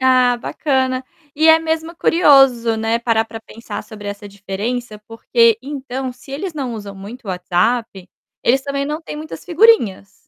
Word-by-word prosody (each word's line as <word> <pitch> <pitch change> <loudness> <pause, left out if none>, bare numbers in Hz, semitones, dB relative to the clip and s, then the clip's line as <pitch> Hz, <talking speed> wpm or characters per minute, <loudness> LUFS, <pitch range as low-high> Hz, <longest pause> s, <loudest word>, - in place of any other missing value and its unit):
Ah, 255 -1 +4
bacana. 260 0 -1 0.3
E 315 +2 +3
é 320 - +8
mesmo 320 +1 -3
curioso, 270 -10 +4
né, 225 +1 0
parar 230 -1 +1
para 225 0 -9
pensar 230 +1 -8
sobre 210 -1 -9
essa 205 0 -7
diferença, 210 +4 -5
porque, 230 0 +2
então, 265 -2 -5
se 250 +2 -16
eles 320 +7 -4
não 260 -6 -4
usam 205 -2 -8
muito 210 +6 -10
o - - -10
WhatsApp, 185 +3 -1 0.3
eles 265 +3 +3
também 280 0 -2
não 300 +2 -3
têm 300 - -7
muitas 310 +1 -8
figurinhas. 340 - +3
245 Hz, 165 wpm, -18 LUFS, 220-280 Hz, 0.3 s, é